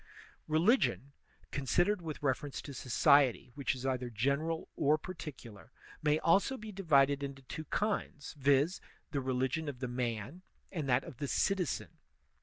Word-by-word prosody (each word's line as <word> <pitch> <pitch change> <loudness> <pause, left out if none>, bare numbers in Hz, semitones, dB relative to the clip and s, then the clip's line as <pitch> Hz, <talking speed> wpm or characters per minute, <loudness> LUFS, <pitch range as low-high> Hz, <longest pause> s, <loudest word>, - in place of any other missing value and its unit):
Religpion, 160 - +2 0.4
conisidered 175 +8 +1
with 155 -3 -6
reference 140 +1 -1
to 140 - -8
society, 130 -1 +3
which 140 -1 -1
is 130 0 -7
either 130 -2 -1
general 140 +8 -1
or 150 +1 +3
particular, 145 - -9 0.3
may 150 0 +3
also 195 +12 +3
be 215 -1 -8
divided 145 -7 +3
into 135 -1 -6
two 155 +4 -7
kinds, 200 -5 -2
viz, 145 +5 +2 0.3
the 140 -2 -1
religion 130 +4 -1
of 135 - -6
the 125 0 -3
man 120 - -3 0.3
and 155 -7 -3
that 125 +1 +3
of 125 - -10
the 140 0 -3
citizen. 185 +1 -1
140 Hz, 145 wpm, -33 LUFS, 130-160 Hz, 0.4 s, society